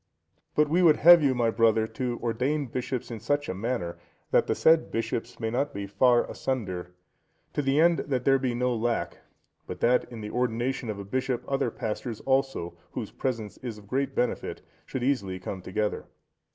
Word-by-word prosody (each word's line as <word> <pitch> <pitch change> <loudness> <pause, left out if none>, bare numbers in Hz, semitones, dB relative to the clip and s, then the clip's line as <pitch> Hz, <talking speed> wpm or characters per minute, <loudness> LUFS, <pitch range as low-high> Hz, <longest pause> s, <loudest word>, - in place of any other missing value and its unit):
But 150 0 +4
we 170 +5 +2
would 165 -4 +7
have 175 +1 +8
you, 135 -3 +3
my 115 -2 +2
brother, 115 -1 +3
to 120 +2 -3
ordain 130 +6 0
bishops 125 0 -4
in 115 - -5
such 145 +6 0
a - - -2
manner, 95 -4 -3 0.3
that - - +4
the - - +1
said 160 0 +4
bishops 115 +1 -3
may 110 -1 -2
not 140 +2 -1
be 100 0 -3
far 120 +4 +3
asunder, 95 -9 -4 0.6
to - - 0
the 135 +1 +2
end 170 +1 +5
that 130 -3 -1
there 135 0 +5
be 125 -2 -1
no 125 +1 +1
lack, 115 +1 -1 0.5
but - - -6
that 125 +1 +3
at 115 -2 -7
the 105 0 -6
ordination 125 +1 -1
of 105 - -3
a 100 - -7
bishop 130 +3 -1
other 135 -3 0
pastors 110 +1 -4
also, 135 -10 0 0.2
whose - - -5
presence 115 -6 -3
is 120 -4 -6
of 105 - -14
great 135 +4 -1
benefit, 125 - -2 0.2
should 130 - -3
easily 100 -9 0
come 95 0 -6
together. 105 +3 -2
120 Hz, 190 wpm, -27 LUFS, 110-135 Hz, 0.6 s, have